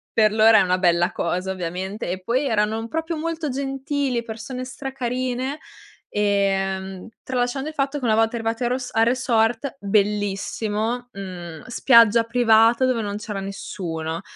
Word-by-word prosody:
Per 215 -1 +5
loro 220 +1 +6
è - - +6
una 185 -1 +2
bella 175 0 +2
cosa 180 +2 -2
ovviamente, 190 +4 -4
e 185 +1 -3
poi 250 +8 0
erano, 215 -2 +1
uhm, 225 - -5
proprio 325 +4 -3
molto 320 -1 -3
gentili, 270 -1 -2
persone 230 +3 -6
stra 265 +1 -7
carine, 255 +2 -2 0.5
ehm, 195 -1 -1
tralasciando 255 +2 -2
il 310 - -6
fatto 275 +1 -1
che 255 - -4
una 220 -2 +3
volta 225 +1 +2
arrivate 225 +1 -2
a - - +2
ros 250 0 -3
al 225 - +4
resort, 240 +1 +1
bellissimo, 210 +3 -1
mhmm, 175 -5 -8
spiaggia 235 -2 +5
privata 230 +1 +4
dove 255 -3 +1
non 205 -1 -3
c'era 210 -2 -5
nessuno, 165 -4 -5
225 Hz, 155 wpm, -23 LUFS, 195-255 Hz, 0.5 s, loro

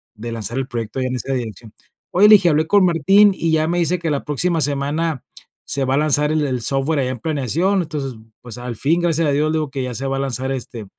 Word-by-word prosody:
de 115 +2 -7
lanzar 115 +2 -4
el 135 -1 -2
proyecto 115 0 -5
ahí 130 - -1
en 125 - -3
esa 135 +3 -4
dirección: 115 -3 -6 0.4
"Oye", 205 +4 +5
le 215 - +10
dije: 195 -3 +3
"Hablé 155 +1 +1
con 200 0 +4
Martín", 195 +5 +5
y 165 -2 -1
ya 155 0 +2
me 175 +1 0
dice 175 +1 0
que 165 -2 -2
la 140 - -2
próxima 160 +3 0
semana 145 +1 -1 0.4
se 140 - -2
va 130 +1 +1
a - - +1
lanzar 150 0 +2
el 155 -1 +1
el 125 -3 -2
software 135 +4 0
allá 130 -1 0
en 125 - -5
planeación, 160 - 0
entonces, 140 -5 -5 0.3
pues, 120 -2 -9
al 125 -1 -5
fin, 165 +5 +1
gracias 165 -2 +1
a - - +2
Dios, 150 +2 +1
le 160 - 0
digo 150 -3 -4
que 135 -2 -3
ya 125 -2 -4
se 135 - -4
va 135 0 -1
a - - -2
lanzar, 135 -1 -3
este, 120 -3 -7
145 Hz, 260 wpm, -19 LUFS, 130-165 Hz, 0.4 s, le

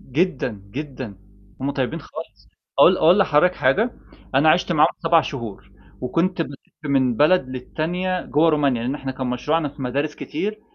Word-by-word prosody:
جدًا، 135 - -1
جدًا 130 -6 -6 0.4
هُم 140 +1 -1
طيبِين 140 +4 -2
خالص - - -11 0.3
أقول - - +7
أقول 170 +5 +5
لحضرتك 180 -1 +4
حاجة، 195 - +2 0.4
أنا 150 +4 +5
عشت 175 +1 +2
معاهم 155 -2 +5
7 165 0 +4
شهور 120 -9 -7 0.3
وكنت 170 +7 0
بلّف 140 -3 -8 0.3
من 130 -4 +2
بلد 150 +1 +4
للّتانية 175 +8 -2
جوا 160 +3 +3
رومانيا، 140 -6 +1
لأن 125 +3 -1
إحنا 135 -2 -5
كان 130 -1 -4
مشروعنا 145 +5 0
في 140 0 -10
مدارس 140 +4 -2
كتير 215 +1 -4
150 Hz, 155 wpm, -22 LUFS, 130-165 Hz, 0.4 s, أقول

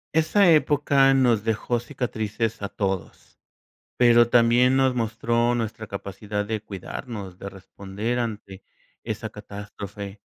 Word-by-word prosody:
Esa 160 +5 +4
época 145 -3 +4
nos 120 -5 +3
dejó 115 +2 -1
cicatrices 115 -3 -3
a 100 - -3
todos, 95 -4 -4 0.6
pero 120 -1 +5
también 120 +2 +4
nos 130 -1 +3
mostró 115 +1 0
nuestra 110 -1 -3
capacidad 100 +1 -5
de 110 +1 -3
cuidarnos, 100 -1 -7
de 100 - -7
responder 100 +4 -5
ante 105 -5 -5 0.4
esa - - -4
catástrofe. 100 0 -9
115 Hz, 115 wpm, -24 LUFS, 100-120 Hz, 0.6 s, pero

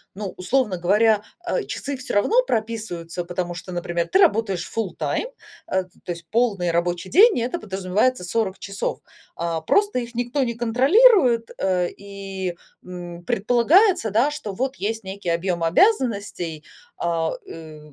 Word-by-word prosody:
ну, 200 -1 -5
условно 210 +1 0
говоря, 210 +4 +3 0.2
э, - - 0
часы 280 0 -5
всё 255 - -6
равно 445 - +3
прописываются, 215 - -3
потому 175 0 -3
что, 185 +1 -8
например, 175 -1 -2
ты 375 - +3
работаешь 220 - +2
full 220 -5 -2
time, - - -2 0.4
э, 190 0 0 0.2
то - - -4
есть 170 -1 -8
полный 215 -7 +1
рабочий 175 +1 -1
день, 425 - +6
и - - -1
это 250 +9 -2
подразумевается 195 - 0
40 195 +1 -1
часов. 195 0 -4 0.4
А, 165 -1 -2
просто 405 - +2
их 235 -1 -6
никто 245 +3 -1
не 235 -2 -1
контролирует, 255 - +4
э, 180 -2 +1
и, 195 -2 -6 0.3
м, 175 -1 -8
предполагается, 245 - +3
да, 235 +8 +3
что 295 -8 -5
вот 260 +6 -2
есть 225 +1 -3
некий 190 -1 -5
объем 170 0 -1
обязанностей, 200 - +1 0.3
а, 165 -1 0 0.2
э, 160 -2 -10
200 Hz, 150 wpm, -23 LUFS, 175-245 Hz, 0.4 s, день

